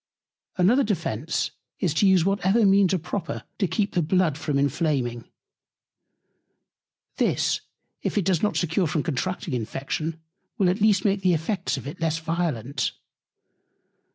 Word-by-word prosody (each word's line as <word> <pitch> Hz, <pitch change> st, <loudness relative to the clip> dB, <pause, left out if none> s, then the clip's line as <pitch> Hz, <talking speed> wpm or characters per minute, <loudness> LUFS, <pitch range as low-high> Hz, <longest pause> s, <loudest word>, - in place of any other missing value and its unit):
Another 220 Hz, +10 st, +4 dB
Defence 165 Hz, -, -1 dB, 0.3 s
is, 175 Hz, -6 st, +1 dB
to 195 Hz, +6 st, +3 dB
use 185 Hz, -3 st, +4 dB
whatever 195 Hz, +3 st, +3 dB
Means 195 Hz, -1 st, +5 dB
are 190 Hz, -, +2 dB
proper 175 Hz, +1 st, -4 dB, 0.2 s
to 195 Hz, -, +2 dB
keep 205 Hz, +2 st, -1 dB
the 175 Hz, -, +2 dB
Blood 170 Hz, -1 st, +2 dB
from 150 Hz, -2 st, -1 dB
Inflaming. 140 Hz, -4 st, 0 dB, 1.9 s
This, -, -, +1 dB, 0.4 s
if -, -, -2 dB
it 200 Hz, -, +1 dB
does 185 Hz, -4 st, +2 dB
not 210 Hz, -, +1 dB
secure 175 Hz, +1 st, +1 dB
from 155 Hz, 0 st, -1 dB
contracting 170 Hz, +1 st, -2 dB
Infection, 140 Hz, +7 st, -3 dB, 0.4 s
will 190 Hz, -5 st, +3 dB
at 195 Hz, +3 st, -3 dB
least 205 Hz, -2 st, +4 dB
make 200 Hz, -1 st, +2 dB
the 180 Hz, -2 st, +3 dB
Effects 160 Hz, -2 st, -2 dB
of 135 Hz, -, -7 dB
it 160 Hz, +6 st, -7 dB
less 160 Hz, -1 st, +1 dB
violent. 160 Hz, -6 st, -2 dB
170 Hz, 145 wpm, -25 LUFS, 150-195 Hz, 1.9 s, Means